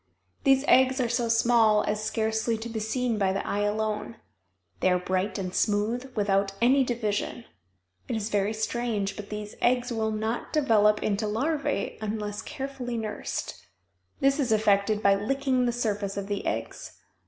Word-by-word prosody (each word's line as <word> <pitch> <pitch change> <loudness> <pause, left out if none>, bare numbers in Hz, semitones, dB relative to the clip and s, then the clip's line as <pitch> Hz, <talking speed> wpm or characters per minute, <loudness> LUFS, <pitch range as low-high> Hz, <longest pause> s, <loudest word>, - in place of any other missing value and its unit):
These 270 +1 +4
eggs 260 +1 +5
are 250 - +2
so 240 0 0
small 230 -2 +4
as 210 0 -2
scarcely 220 +1 0
to 225 +2 -6
be 225 -1 -3
seen 230 +1 -1
by 195 -2 +2
the 195 - -2
eye 205 - -1
alone. 215 +2 -1 0.6
They - - +3
are 180 - +3
bright 185 +2 -1
and 185 -2 -4
smooth, 225 +5 0
without 200 -2 +1
any 265 +3 +4
division. 230 -1 -2 0.6
It - - -2
is 220 0 -2
very 205 0 +1
strange, 220 -2 -2
but 205 -1 -8
these 210 0 -6
eggs 245 +1 +2
will 220 -1 0
not 220 +2 -3
develop 215 -8 +3
into 210 +1 0
larvæ 280 +1 -1
unless 210 -1 -3
carefully 270 -3 -5
nursed. 215 -2 -4 0.6
This 275 +2 +3
is 255 -5 0
effected 210 0 +2
by 200 - +6
licking 255 +4 0
the - - +2
surface 205 -4 -2
of 200 - -3
the 200 0 -3
eggs. 115 +1 -4
220 Hz, 165 wpm, -27 LUFS, 205-240 Hz, 0.6 s, by